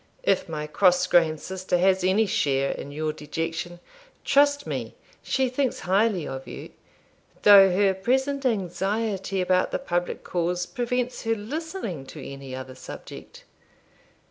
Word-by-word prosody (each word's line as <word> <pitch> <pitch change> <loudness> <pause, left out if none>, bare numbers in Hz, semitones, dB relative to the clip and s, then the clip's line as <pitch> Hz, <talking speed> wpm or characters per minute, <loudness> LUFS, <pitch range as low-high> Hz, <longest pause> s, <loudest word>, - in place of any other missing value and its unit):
'If - - +1
my 150 -1 -4
cross 180 +3 +3
grained 160 -3 +3
sister 185 -1 -2
has 190 +1 +3
any 190 +4 +3
share 140 -7 +1
in 140 - -6
your 155 +1 -2
dejection, 165 +3 -4 0.5
trust 285 0 +3
me - - -4 0.3
she 265 -1 0
thinks 255 +1 -1
highly 195 -1 +1
of 135 0 -6
you, - - -8 0.7
though 200 -2 +9
her 195 +1 +3
present 265 +8 0
anxiety 195 -2 -1
about 185 0 +2
the - - -1
public 175 0 -2
cause 175 0 -1
prevents 250 +2 -2
her 225 0 +2
listening 225 - -5
to 155 - -10
any 135 -1 -8
other 130 0 -7
subject. 130 - -11
185 Hz, 140 wpm, -25 LUFS, 165-225 Hz, 0.7 s, though